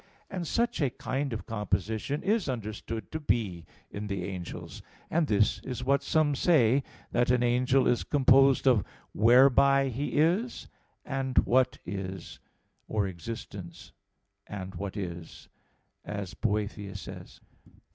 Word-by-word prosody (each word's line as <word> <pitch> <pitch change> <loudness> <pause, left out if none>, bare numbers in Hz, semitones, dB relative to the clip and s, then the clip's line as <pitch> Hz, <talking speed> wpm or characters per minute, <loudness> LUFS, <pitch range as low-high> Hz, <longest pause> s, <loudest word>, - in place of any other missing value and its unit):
And 180 -4 -4
such 235 -4 0
a 140 - +3
kind 135 +3 -3
of 110 - -5
composition 110 +5 -2
is 205 -4 +1
understood 110 -1 -5
to 160 - -3
be 105 - -1 0.3
in 105 +1 -5
the 100 -3 -3
angels; 90 -2 -7 0.3
and 160 -1 +2
this 105 -2 +2
is 125 -1 -5
what 140 +1 +2
some 150 0 +2
say, 135 -4 +4 0.3
that 120 0 +2
an 125 -1 +3
angel 125 +2 +3
is 120 - +2
composed 135 -1 +4
of, 120 -7 +5 0.3
"whereby 135 +4 +5
he 135 +4 -3
is," 180 +11 +1 0.4
and 130 -1 -3
"what 130 +1 +3
is," 95 -2 -6 0.5
or 105 -2 0
"existence," 95 -1 -8 0.6
and 95 -2 -6
"what 100 +3 -5
is," 85 -4 -7 0.5
as 100 -3 -5
Boethius 105 -2 -2
says. - - -10
120 Hz, 130 wpm, -29 LUFS, 100-140 Hz, 0.6 s, of